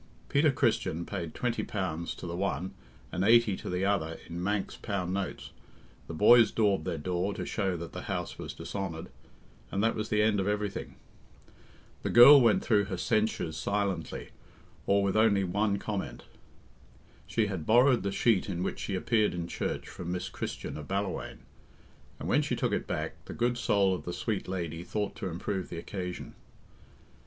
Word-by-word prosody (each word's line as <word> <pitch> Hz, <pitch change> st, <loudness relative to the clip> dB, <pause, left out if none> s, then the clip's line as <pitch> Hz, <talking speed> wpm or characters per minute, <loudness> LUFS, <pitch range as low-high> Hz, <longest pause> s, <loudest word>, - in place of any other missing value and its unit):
Peter 145 Hz, +1 st, +4 dB
Christian 115 Hz, -, 0 dB
paid 85 Hz, -6 st, -5 dB
twenty 120 Hz, -2 st, -1 dB
pounds 85 Hz, -5 st, -3 dB
to -, -, -9 dB
the 85 Hz, 0 st, -4 dB
one 95 Hz, 0 st, -2 dB, 0.4 s
and 90 Hz, -, -1 dB
eighty 115 Hz, -1 st, +5 dB
to -, -, -7 dB
the 90 Hz, +1 st, 0 dB
other 80 Hz, -5 st, 0 dB
in 85 Hz, +1 st, -5 dB
Manx 100 Hz, +1 st, -1 dB
pound 95 Hz, -3 st, -3 dB
notes, 100 Hz, 0 st, -4 dB, 0.6 s
the -, -, -6 dB
boys 115 Hz, +5 st, +7 dB
daubed 100 Hz, -7 st, +2 dB
their -, -, -2 dB
door 90 Hz, +5 st, -2 dB
to -, -, -4 dB
show 95 Hz, -4 st, -1 dB
that 85 Hz, 0 st, -7 dB
the -, -, -5 dB
house -, -, -4 dB
was -, -, -6 dB
dishonoured, 90 Hz, -5 st, -5 dB, 0.6 s
and 100 Hz, -, -1 dB
that 115 Hz, -, +3 dB
was 110 Hz, 0 st, -4 dB
the 105 Hz, -1 st, +3 dB
end 105 Hz, -2 st, +3 dB
of 95 Hz, -, 0 dB
everything. 105 Hz, -1 st, -2 dB, 1.1 s
The -, -, -2 dB
girl 135 Hz, +4 st, +10 dB
went 115 Hz, -3 st, +4 dB
through 105 Hz, -2 st, +3 dB
her 95 Hz, -2 st, -4 dB
"censures" 110 Hz, -6 st, 0 dB
silently, 100 Hz, -1 st, -2 dB, 0.6 s
or 100 Hz, 0 st, +4 dB
with 100 Hz, 0 st, 0 dB
only 110 Hz, -3 st, +4 dB
one 100 Hz, +2 st, +1 dB
comment. 95 Hz, -, -4 dB, 1.0 s
She 115 Hz, -, +1 dB
had 95 Hz, -6 st, -4 dB
borrowed 125 Hz, +2 st, +5 dB
the 100 Hz, -, -2 dB
sheet 105 Hz, -2 st, +2 dB
in 90 Hz, -1 st, -2 dB
which -, -, -3 dB
she 100 Hz, -, -3 dB
appeared 105 Hz, +1 st, +1 dB
in 85 Hz, -1 st, -3 dB
church -, -, -3 dB
from 90 Hz, 0 st, -6 dB
Miss 90 Hz, 0 st, -3 dB
Christian -, -, -5 dB
of 75 Hz, -1 st, -8 dB
Ballawhaine, 95 Hz, +1 st, -3 dB, 0.8 s
and -, -, -5 dB
when -, -, +3 dB
she -, -, -1 dB
took -, -, 0 dB
it -, -, -1 dB
back, -, -, -4 dB
the -, -, -7 dB
good 120 Hz, +1 st, +1 dB
soul 100 Hz, -5 st, +2 dB
of 90 Hz, -, -5 dB
the 90 Hz, -, -4 dB
sweet 105 Hz, 0 st, -2 dB
lady 85 Hz, -3 st, -4 dB
thought 105 Hz, +2 st, -3 dB
to 95 Hz, -, -3 dB
improve 90 Hz, +2 st, -3 dB
the 85 Hz, -, -6 dB
occasion. 90 Hz, +1 st, -5 dB
100 Hz, 180 wpm, -30 LUFS, 90-110 Hz, 1.1 s, girl